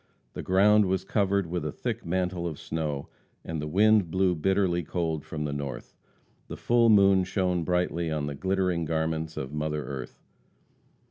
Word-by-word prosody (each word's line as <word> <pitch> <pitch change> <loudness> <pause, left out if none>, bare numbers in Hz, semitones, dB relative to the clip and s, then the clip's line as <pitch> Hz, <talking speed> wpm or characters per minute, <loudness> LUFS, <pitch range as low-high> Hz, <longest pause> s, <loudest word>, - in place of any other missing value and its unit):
The - - -5
ground 105 +2 +4
was 95 0 0
covered 100 -1 +1
with 85 +1 -3
a - - -3
thick - - -4
mantle 90 0 -1
of 80 -4 -5
snow, 75 -3 -4 0.4
and 80 -2 -4
the 75 - -4
wind 105 +2 +4
blew 95 +1 +2
bitterly 90 +1 +1
cold 80 -2 -2
from 75 -1 -5
the 70 - -3
north; 70 -1 -6 0.5
the - - -7
full 120 -1 +3
moon 100 -3 +5
shone 90 -2 0
brightly 90 -1 0
on 75 -2 -2
the 75 - -4
glittering 90 +1 0
garments 80 0 -2
of 65 +1 -5
mother 75 0 -2
earth. 65 -3 -7
85 Hz, 165 wpm, -27 LUFS, 80-95 Hz, 0.5 s, moon